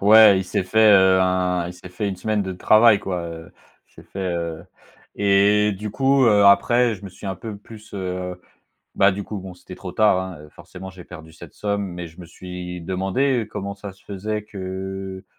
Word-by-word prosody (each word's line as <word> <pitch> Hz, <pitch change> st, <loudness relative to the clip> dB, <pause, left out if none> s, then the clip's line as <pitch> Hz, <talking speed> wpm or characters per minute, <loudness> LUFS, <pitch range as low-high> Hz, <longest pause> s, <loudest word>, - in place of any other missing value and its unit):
Ouais, 105 Hz, -1 st, +7 dB
il 95 Hz, -, -2 dB
s'est 95 Hz, -, -1 dB
fait, 110 Hz, +3 st, +4 dB
heu, 95 Hz, -1 st, +5 dB
un 90 Hz, -1 st, +1 dB
il -, -, -7 dB
s'est 90 Hz, -, -12 dB
fait 90 Hz, +3 st, -3 dB
1 95 Hz, -, -4 dB
semaine 105 Hz, +2 st, -1 dB
de 95 Hz, -1 st, -4 dB
travail, 110 Hz, +3 st, +5 dB
quoi, 90 Hz, -3 st, -4 dB
heu 80 Hz, 0 st, -10 dB, 0.4 s
il -, -, -32 dB
s'est -, -, -14 dB
fait, 95 Hz, -2 st, -4 dB
heu 85 Hz, -1 st, -4 dB, 0.5 s
et 100 Hz, +1 st, +3 dB
du 105 Hz, +2 st, -6 dB
coup, 135 Hz, +3 st, +3 dB
heu, 105 Hz, -3 st, +5 dB
après 115 Hz, +4 st, +4 dB
je 100 Hz, 0 st, -12 dB
me -, -, -6 dB
suis 100 Hz, -, -11 dB
un 95 Hz, -, -2 dB
peu 105 Hz, +3 st, -8 dB
plus, 105 Hz, +1 st, -14 dB
heu 90 Hz, -1 st, -5 dB, 0.5 s
bah 100 Hz, +1 st, +4 dB
du 100 Hz, +1 st, -5 dB
coup, 105 Hz, -, -6 dB
bon 95 Hz, -1 st, -9 dB
c'était 90 Hz, +1 st, -12 dB
trop 90 Hz, -2 st, -8 dB
tard, 105 Hz, -4 st, +3 dB
hein, 95 Hz, -4 st, -5 dB
heu, 75 Hz, -, -13 dB
forcément 95 Hz, +5 st, -11 dB
j'ai 90 Hz, -2 st, -13 dB
perdu 80 Hz, -2 st, -12 dB
cette 80 Hz, -, -13 dB
somme. 100 Hz, -1 st, -2 dB
Mais 90 Hz, -1 st, -6 dB
je 80 Hz, +3 st, -15 dB
me 85 Hz, -, -10 dB
suis 90 Hz, 0 st, -8 dB
demandé, 95 Hz, +9 st, 0 dB
heu, -, -, -15 dB
comment 100 Hz, -2 st, -6 dB
ça 100 Hz, -1 st, -9 dB
se 95 Hz, -, -25 dB
faisait 105 Hz, +2 st, -4 dB
que 95 Hz, -1 st, -7 dB
95 Hz, 220 wpm, -22 LUFS, 90-105 Hz, 0.5 s, Ouais